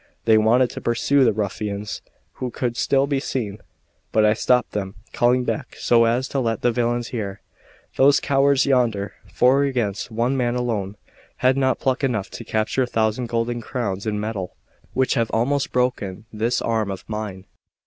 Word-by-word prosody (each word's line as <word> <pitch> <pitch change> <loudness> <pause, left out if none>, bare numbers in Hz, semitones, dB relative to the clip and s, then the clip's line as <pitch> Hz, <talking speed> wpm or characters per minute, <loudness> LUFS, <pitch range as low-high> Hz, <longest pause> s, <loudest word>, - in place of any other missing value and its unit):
They 110 -1 +5
wanted 120 +3 +3
to - - -7
pursue 135 +4 +2
the 115 - +4
ruffians, 105 0 -3 0.4
who 130 - -1
could 120 -1 -3
still 135 +2 +2
be 140 -1 0
seen; 110 -7 -3 0.5
but 110 -1 +4
I 105 - +5
stopped 125 +2 +2
them, 100 -2 -4 0.2
calling 125 +1 +3
back 135 +2 -3
so 115 -1 +4
as 120 +3 +1
to 140 - -1
let 115 -3 -1
the 120 - +4
villains 120 0 -1
hear: 100 -6 -4 0.6
"Those 140 +1 +5
cowards 140 0 +3
yonder, 115 -7 +1 0.2
four 130 +3 +4
against 120 -8 -1
one 120 +4 0
man 120 -2 0
alone, 105 -5 -2 0.5
had 130 +1 +5
not 130 -1 +1
pluck 135 +1 0
enough 115 -7 -1
to - - -7
capture 110 +4 0
a 125 - +1
thousand 115 +1 0
golden 120 +1 -1
crowns 110 -4 -3
in 105 -1 -1
metal, 105 -4 -4 0.4
which 130 0 +2
have 115 -1 0
almost 135 +5 0
broken 115 -6 -1
this 115 +3 0
arm 110 -3 0
of 95 -2 -6
mine. 105 -3 -5
120 Hz, 175 wpm, -22 LUFS, 105-130 Hz, 0.6 s, They